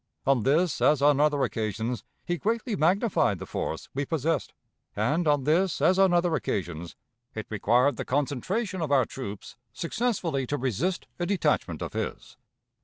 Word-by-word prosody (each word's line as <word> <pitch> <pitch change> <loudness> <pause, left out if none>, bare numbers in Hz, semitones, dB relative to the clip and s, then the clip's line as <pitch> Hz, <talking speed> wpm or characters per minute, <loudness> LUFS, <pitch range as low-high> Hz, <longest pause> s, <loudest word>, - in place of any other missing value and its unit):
On 135 -3 +3
this 145 +5 +2
as 150 - +4
on 145 -1 +5
other 145 -2 +3
occasions 110 0 -2 0.2
he 175 -1 -2
greatly 230 +1 -1
magnified 175 - +2
the - - -7
force 80 - -4
we 140 - -1
possessed, 160 0 -1 0.4
and 150 +11 +1
on 145 -2 +3
this 165 +5 +2
as 185 +1 +3
on 190 -1 +5
other 175 -1 +2
occasions 85 - -3 0.4
it 110 -2 -4
required 120 +6 +2
the - - -2
concentration 175 - -1
of 155 -3 -2
our 135 -4 +4
troops 105 -4 -8 0.2
successfully 170 - -1
to 145 - -1
resist 140 - -1
a 175 - -1
detachment 200 -1 0
of - - -6
his. - - -5
145 Hz, 160 wpm, -27 LUFS, 125-175 Hz, 0.4 s, on